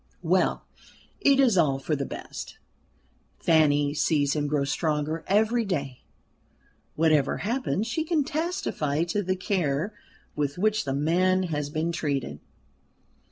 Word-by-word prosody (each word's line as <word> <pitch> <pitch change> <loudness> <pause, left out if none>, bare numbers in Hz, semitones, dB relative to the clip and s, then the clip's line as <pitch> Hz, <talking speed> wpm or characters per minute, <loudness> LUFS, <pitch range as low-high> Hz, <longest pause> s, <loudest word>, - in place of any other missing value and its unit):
Well - - +1 0.5
it 275 -1 +4
is 235 -9 +4
all 140 -5 +3
for 145 +3 -2
the 140 -1 -3
best. - - -8 0.8
Fanny 145 -3 +3
sees 145 -2 +1
him 145 -1 0
grow 145 -1 0
stronger 150 +2 -1
every 220 +4 +2
day 140 - -3 0.9
whatever 155 -2 +2
happens 230 -2 -1
she 310 +7 -1
can 315 -2 +1
testify 290 - -1
to 175 +4 -1
the 185 -1 -1
care 180 -1 -1 0.4
with 145 0 -2
which 215 +1 +1
the 135 -1 -1
man 185 +6 +2
has 145 -1 -2
been 160 +2 -1
treated. 140 - -2
160 Hz, 130 wpm, -26 LUFS, 145-205 Hz, 0.9 s, it